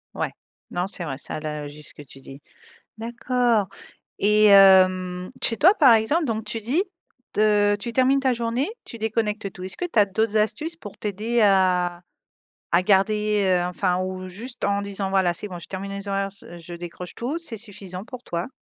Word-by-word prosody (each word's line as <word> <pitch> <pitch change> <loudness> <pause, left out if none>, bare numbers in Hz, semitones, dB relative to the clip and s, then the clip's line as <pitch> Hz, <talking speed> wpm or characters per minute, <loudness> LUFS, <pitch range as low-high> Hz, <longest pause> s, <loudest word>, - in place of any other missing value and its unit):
Ouais, - - -2 0.4
non, 180 +1 -1
c'est 195 - -5
vrai. 140 -5 -4
Ça - - -6
a - - -4
l'air 150 -1 -5
juste 150 +1 -12
ce - - -15
que - - -12
tu 135 -1 -13
dis. 135 +1 -12 0.6
D'accord 235 -2 0 0.5
et 210 +1 +4
hem, 185 -2 +5
chez 230 - +3
toi, 360 - +6
par 275 - +6
exemple, 255 +10 +2
donc 225 -5 -2
tu 225 +2 -3
dis 260 - 0 0.5
te 210 -1 +3
tu 205 +3 -5
termines 260 +2 +3
ta 265 -1 +2
journée, 235 +4 -1 0.2
tu - - -9
déconnectes 215 -2 -2
tout. 185 - -9
Est-ce 190 - -4
que 360 - -2
tu - - +1
as 205 - +7
d'autres 220 +2 -1
astuces 225 +11 0
pour 205 - -11
t'aider 215 +3 -2
à 180 -3 +2 0.7
à 170 +1 +4
garder, 210 +2 +2
heu, 180 -1 +2
enfin, 180 0 0
ou, 185 0 -5
juste, 235 +7 -6
en 200 0 +1
disant: 200 -1 -3
«Voilà, 190 -2 +2
c'est 175 - -5
bon. 180 -2 -8
Je - - -9
termine 195 +1 -5
les 200 0 -6
horaires 195 0 0
s 195 0 -10
je 170 +1 -9
décroche 175 +1 -8
tout». 265 +8 -3
C'est 320 -9 -4
suffisant 200 -3 -8
pour 250 +1 -10
toi? 170 +4 -3
200 Hz, 200 wpm, -23 LUFS, 185-225 Hz, 0.7 s, as